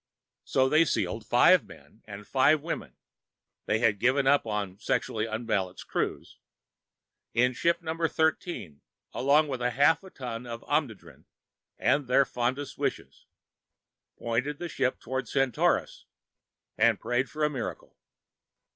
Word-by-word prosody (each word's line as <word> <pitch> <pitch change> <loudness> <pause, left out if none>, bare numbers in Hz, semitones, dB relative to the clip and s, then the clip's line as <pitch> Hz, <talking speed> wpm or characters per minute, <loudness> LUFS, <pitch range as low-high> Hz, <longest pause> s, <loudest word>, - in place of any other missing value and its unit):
So 130 0 +2
they 155 +4 +5
sealed 105 - -2
five - - +5
men 110 - -16
and 105 -1 -9
five 145 +5 +3
women 165 - -5 0.7
they 105 - +2
had 110 -3 +2
given 130 +4 +2
up 140 -3 +3
on 100 -3 -3
sexually 110 0 -1
unbalanced 110 -5 -3
crews - - -3 1.0
in 125 +2 +3
ship 170 +6 0
Number 165 0 -1
Thirteen, 160 - -2 0.3
along 145 +4 +3
with 130 -3 -4
half 140 +7 +3
a 190 - -11
ton 125 -5 -7
of 115 0 -7
Omnidrene 145 -9 -3 0.5
and 145 -2 +1
their 135 +2 +4
fondest 130 +4 -3
wishes, - - -4 0.9
pointed 125 +6 -2
the 175 +2 -5
ship 130 -4 -1
towards 130 +2 -4
Centaurus, 135 -3 0 0.7
and 110 -1 +4
prayed 120 +3 -1
for 155 0 -4
a 150 - +3
miracle. 125 -6 -6
125 Hz, 130 wpm, -28 LUFS, 115-145 Hz, 1.0 s, they